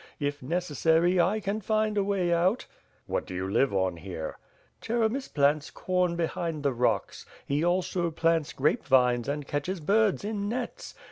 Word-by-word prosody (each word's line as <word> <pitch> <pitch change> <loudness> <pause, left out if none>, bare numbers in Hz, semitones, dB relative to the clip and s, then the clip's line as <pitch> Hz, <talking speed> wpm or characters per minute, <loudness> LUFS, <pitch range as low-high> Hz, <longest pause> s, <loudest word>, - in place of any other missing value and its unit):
If 145 0 -2
necessary 165 +3 +2
I 195 +6 +1
can 210 +1 -2
find 215 +1 0
a 200 - +2
way 190 -3 +1
out." 180 +7 +2 0.4
"What - - -2
do 90 - -6
you 95 +1 -2
live 130 +7 +2
on 95 -3 0
here?" 80 -2 -6 0.4
"Cheremis 235 +3 0
plants 145 +1 +2
corn 180 -2 0
behind 165 -2 -2
the 140 -2 +1
rocks. 125 +1 0 0.2
He 145 +3 0
also 175 0 +1
plants 165 -1 +1
grape 145 +3 +1
vines 125 -2 +3
and 145 0 -2
catches 145 +7 -3
birds 205 +5 +2
in 205 -1 -2
nets. 245 +1 -5
170 Hz, 160 wpm, -28 LUFS, 145-195 Hz, 0.4 s, vines